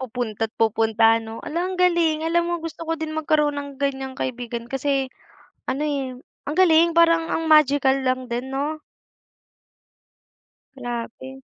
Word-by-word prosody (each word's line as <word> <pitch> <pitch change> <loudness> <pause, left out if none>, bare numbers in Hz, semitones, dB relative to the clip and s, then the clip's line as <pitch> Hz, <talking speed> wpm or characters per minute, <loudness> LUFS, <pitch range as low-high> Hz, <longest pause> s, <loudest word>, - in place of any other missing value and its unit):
Pupunta't 225 -3 -3
pupunta 225 0 +3
'no? 225 0 -8
Ala, 335 +3 -2
ang 370 0 -3
galing. 335 -3 +2
Alam 340 +1 +2
mo 345 - 0
gusto 330 0 -7
ko - - +1
din 315 0 -4
magkaroon 300 -1 +1
ng 285 0 -7
ganyang 270 -1 -2
kaibigan 240 -2 -4
kasi, 270 0 0 0.6
ano, 275 +3 -2
eh, 275 -3 -2 0.3
ang 295 - -3
galing, 335 -2 +5
parang 330 -1 +4
ang 325 - -1
magical 285 -3 +5
lang 255 0 +1
din 245 +2 -3
'no? 295 +3 -2 2.0
Grabe. 245 +1 -6
275 Hz, 140 wpm, -23 LUFS, 245-315 Hz, 2.0 s, galing